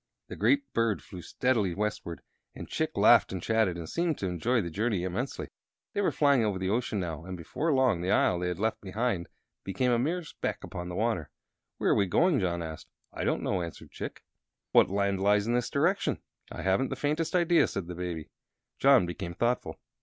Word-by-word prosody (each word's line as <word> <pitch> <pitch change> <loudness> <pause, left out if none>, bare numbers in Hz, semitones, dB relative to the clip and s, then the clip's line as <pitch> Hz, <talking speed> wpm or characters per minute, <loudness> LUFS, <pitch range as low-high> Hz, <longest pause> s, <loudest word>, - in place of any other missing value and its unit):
The - - -6
great 285 0 +3
bird 115 -3 +1
flew 90 -3 -9
steadily 105 0 0
westward, 105 -6 -3 0.3
and - - -8
Chick - - -2
laughed - - +6
and 95 - -3
chatted, 110 -2 +1
and 85 -2 -6
seemed 170 - -1
to - - -3
enjoy 95 +8 +1
the 85 -5 -3
journey 105 0 0
immensely. 95 +9 -3 0.4
They 205 - 0
were 200 - +2
flying 140 -5 +3
over 105 -3 0
the 95 +1 -1
ocean 115 -2 0
now, 80 -4 -4
and 90 0 -6
before 150 - -2
long 130 -10 +3
the 90 - -2
Isle 90 -2 +3
they 90 - -1
had 90 - -2
left 110 +3 -1
became 100 +1 -3
a 120 - +3
mere 170 +8 -1
speck 155 - -4
upon 90 0 -6
the 90 - -5
water. 105 -8 -1 0.5
"Where - - +1
are - - +4
we 100 - +2
going?" 165 - +3
John 85 -3 -1
asked. 80 -2 -7 0.3
"I - - -4
don't - - 0
know," 95 - 0
answered 85 -1 -8
Chick. - - -7 0.5
"What - - +5
land 100 0 0
lies 100 +1 +3
in 120 - 0
this 120 -1 0
direction?" - - +1 0.3
"I - - -6
haven't 95 +8 +2
the - - -3
faintest 155 +4 -1
idea," 175 -1 +4
said 100 - -4
the 90 - -6
Baby. 85 -3 -5 0.5
John 135 -7 +6
became 85 0 -5
thoughtful. 120 +4 -1
100 Hz, 205 wpm, -29 LUFS, 90-125 Hz, 0.5 s, laughed